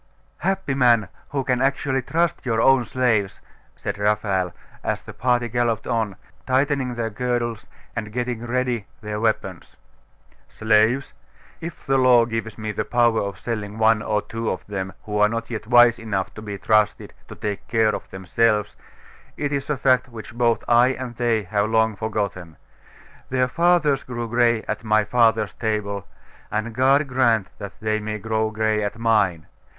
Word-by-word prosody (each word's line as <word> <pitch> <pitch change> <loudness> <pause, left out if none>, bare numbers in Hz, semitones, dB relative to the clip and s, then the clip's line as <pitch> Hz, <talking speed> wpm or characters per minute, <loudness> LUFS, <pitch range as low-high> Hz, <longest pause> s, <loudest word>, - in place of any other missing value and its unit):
'Happy 190 -7 -1
man, 120 -7 +3 0.2
who 140 -1 -1
can 125 -1 0
actually 135 0 +1
trust 165 +5 0
your 115 -3 0
own 135 0 +4
slaves!' 110 -6 0 0.4
said 100 0 -5
Raphael, 100 -3 +1 0.3
as - - -2
the - - -10
party 120 0 +1
galloped 120 -1 0
on, 110 -5 -1 0.3
tightening 130 -1 +1
their 115 -1 -2
girdles 120 -1 -2 0.3
and 105 -3 -4
getting 120 0 -3
ready 125 -3 -1
their 105 0 -4
weapons. 105 -5 -2 0.7
'Slaves? 110 +5 +2 0.5
If 170 -1 -8
the 135 0 +2
law 125 -2 +6
gives 115 -2 -4
me 110 0 -3
the 105 - -2
power 120 -2 +2
of 100 -2 -4
selling 105 -1 -4
one 110 -1 +4
or 105 -1 -1
two 115 0 -4
of - - -4
them 95 -2 -4
who 105 -1 -3
are 105 0 +5
not 115 +1 -4
yet 110 -1 -5
wise 120 0 +6
enough 100 -4 -3
to 110 - -9
be 105 -2 -6
trusted 105 +2 +1
to - - -9
take 105 -2 -4
care 110 -2 +2
of - - -6
themselves, 105 +2 0 0.6
it 145 -1 -2
is 140 0 -3
a 150 - 0
fact 130 -1 +2
which 115 0 -10
both 120 -1 +1
I 120 +2 +5
and 125 -2 -6
they 115 -3 +1
have 100 +2 0
long 110 -1 +2
forgotten. 100 -6 -4 0.7
Their 130 0 +1
fathers 165 -2 +2
grew 120 -2 -5
gray 120 -1 +2
at 105 +1 -4
my 110 -1 +3
father's 110 -1 +2
table, 105 -3 -3 0.4
and 110 +2 -2
God 135 +5 +3
grant 120 -6 +2
that 100 -2 -8
they 110 0 0
may 105 0 -4
grow 110 +1 -1
gray 110 0 0
at 105 +2 -3
mine! 105 -8 +1
115 Hz, 165 wpm, -23 LUFS, 105-125 Hz, 0.7 s, law